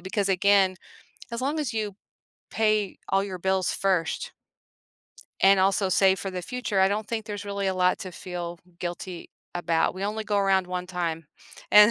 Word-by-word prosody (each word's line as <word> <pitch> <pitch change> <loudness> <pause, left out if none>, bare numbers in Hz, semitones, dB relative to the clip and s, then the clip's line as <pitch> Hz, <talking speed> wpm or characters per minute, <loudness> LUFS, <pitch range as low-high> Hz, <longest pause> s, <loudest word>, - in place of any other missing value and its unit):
because 195 +2 -1
again, 195 0 +4 0.6
as 235 +1 -3
long 290 +4 0
as 280 -7 -2
you 210 -3 -2 0.6
pay 215 -2 +1
all 195 0 +3
your 190 -2 -5
bills 190 0 +1
first 185 -4 0 1.1
and 195 0 +6
also 195 0 +2
save 190 +1 +4
for 195 - -4
the 180 -1 -5
future, 240 -2 -1
I 190 - +5
don't 210 +1 -2
think 220 -1 -3
there's 205 -2 -6
really 200 -1 -2
a 190 - +1
lot 180 0 +2
to 185 -2 -6
feel 175 -1 -6 0.2
guilty 175 0 -6 0.2
about; 170 -2 +1
we 190 +1 -4
only 215 +1 -2
go 205 -1 +1
around 195 -2 +3
1 180 0 -4
time, 170 -3 -3 0.4
and, 210 +1 +9
195 Hz, 175 wpm, -26 LUFS, 180-205 Hz, 1.1 s, and